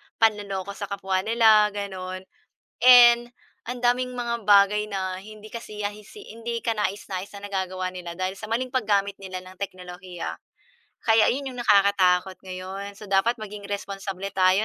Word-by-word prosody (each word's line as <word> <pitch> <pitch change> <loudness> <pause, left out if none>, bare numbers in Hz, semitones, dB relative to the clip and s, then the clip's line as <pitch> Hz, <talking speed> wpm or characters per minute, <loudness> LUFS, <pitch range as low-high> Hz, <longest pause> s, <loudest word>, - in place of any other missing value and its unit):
panloloko 200 -3 0
sa 200 0 -6
kapwa 195 -1 -1
nila, 220 -2 +6
gano'n. 185 -2 -5 0.6
And 240 -1 +8 0.4
ang 245 +1 -4
daming 250 +1 +1
mga 235 -1 -2
bagay 205 +1 +5
na 190 -1 -3
hindi 215 +1 -12
kasiya 210 -3 -5 0.2
si 415 - -12
hindi 230 0 -4
kanais-nais 205 -3 -2
na 200 0 -7
nagagawa 185 -2 -3
nila 175 -2 -7
dahil 185 +1 -2
sa 215 - -7
maling 250 +3 -1
paggamit 200 -4 +1
nila 185 -1 -5
ng 185 - -12
teknolohiya. 180 -2 -6 0.7
Kaya 225 -1 +5
ayun 270 0 -1
yung 250 - -6
nakakatakot 195 -3 +4
ngayon. 190 +2 -6
So, 210 - -10
dapat 200 +5 +2
maging 210 -1 -8
responsable 195 -1 -4
tayo, 190 +2 +3
200 Hz, 150 wpm, -25 LUFS, 190-225 Hz, 0.7 s, And